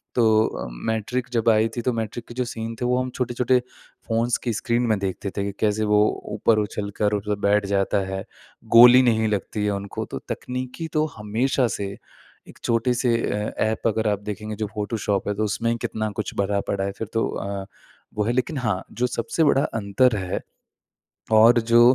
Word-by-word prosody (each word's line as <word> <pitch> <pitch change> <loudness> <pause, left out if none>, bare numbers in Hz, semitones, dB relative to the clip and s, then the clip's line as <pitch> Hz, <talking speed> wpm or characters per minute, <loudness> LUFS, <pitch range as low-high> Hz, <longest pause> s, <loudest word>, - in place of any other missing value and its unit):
तो 110 -2 +4
अ, - - -5 0.2
मैट्रिक्स 120 +3 -2
जब 115 -1 +2
आई 110 0 +4
थी 120 - -2
तो 125 +1 0
मैट्रिक्स 115 +1 -4
के - - -8
जो 125 -1 -1
सीन 115 -1 -5
थे - - 0
वो 125 0 +2
हम 130 - -3
छोटे-छोटे 125 0 +1 0.5
फ़ोन्स 115 +1 +1
की 120 -3 -1
स्क्रीन 120 +2 0
में 110 -2 +2
देखते 100 +1 -3
थे 100 - 0
कि 100 - -2
कैसे 110 0 +1
वो 105 - +6 0.3
ऊपर 110 +1 +3
उछल 105 0 -3
कर 105 0 +2
मतलब 105 0 -2
बैठ 100 0 +3
जाता 100 0 +1
है, 95 0 -4 0.5
गोली 125 +2 +10
नहीं 110 -3 +2
लगती 105 0 -2
है 105 - +1
उनको। 100 0 -4
तो - - -6
तकनीकी 130 +6 -4
तो 155 0 +2
हमेशा 120 +5 +1
से 100 -1 -3 0.6
एक - - -15
छोटे 115 +2 +1
से 120 -1 +1 0.2
अ, 105 +1 -2
ऐप 110 +1 -1
अगर 110 0 0
आप 105 - 0
देखेंगे 105 +1 -6
जो 105 0 -3
फोटोशॉप 105 -1 -1
है 105 - +1
तो 110 - -1
उसमें 115 +3 0
कितना 110 -1 -3
कुछ - - -6
भरा 100 0 +1
पड़ा 100 -1 -1
है 100 - -1
फ़िर 110 - -3
तो 115 - +1
अ, 100 -1 -4 0.5
वो 105 - +1
है 115 - 0
लेकिन 130 +4 -1
हाँ 110 -8 -1
जो 125 +1 0
सबसे 125 +6 -1
बड़ा 140 -2 +4
अंतर 115 +1 +1
है 95 -1 -2 0.9
और 115 +2 +7
जो 115 +1 +4
110 Hz, 200 wpm, -23 LUFS, 105-120 Hz, 0.9 s, गोली